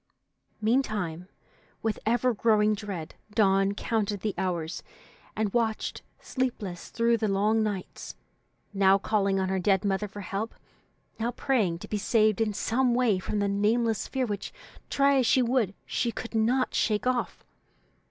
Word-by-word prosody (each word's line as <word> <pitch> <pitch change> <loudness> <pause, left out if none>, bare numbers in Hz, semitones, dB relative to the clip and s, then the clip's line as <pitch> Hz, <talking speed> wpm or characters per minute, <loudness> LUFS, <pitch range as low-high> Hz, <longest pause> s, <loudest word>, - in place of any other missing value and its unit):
Meantime, 210 -8 0 0.6
with 220 -1 -1
ever 245 +2 +2
growing 215 -1 +3
dread, 195 -6 -5 0.2
Dawn 195 -2 +3
counted 210 -3 -1
the 210 -2 -1
hours, 170 -3 -2 0.5
and 215 -2 -1
watched 225 -2 -1 0.2
sleepless 215 -9 -3
through 230 0 +2
the 220 -1 0
long 210 +3 +2
nights, 205 -4 -4 0.6
now 195 -1 +5
calling 200 -1 +1
on 190 0 0
her 190 0 0
dead 190 +1 +2
mother 200 +1 0
for 205 +1 -9
help, 200 +4 -4 0.6
now 230 +2 0
praying 225 -8 0
to - - -10
be 210 - -2
saved 215 0 +2
in 220 -1 +2
some 240 +4 +1
way 235 -6 +2
from 210 - -3
the 200 0 +1
nameless 220 +3 +1
fear 265 -2 -1
which, 205 -3 -4 0.4
try 280 0 +3
as 250 - +2
she 260 -4 +4
would, 235 -5 +1
she 235 - -1
could 230 +1 -7
not 240 +4 +1
shake 210 0 +1
off. 250 -1 -1
215 Hz, 150 wpm, -27 LUFS, 195-235 Hz, 0.6 s, now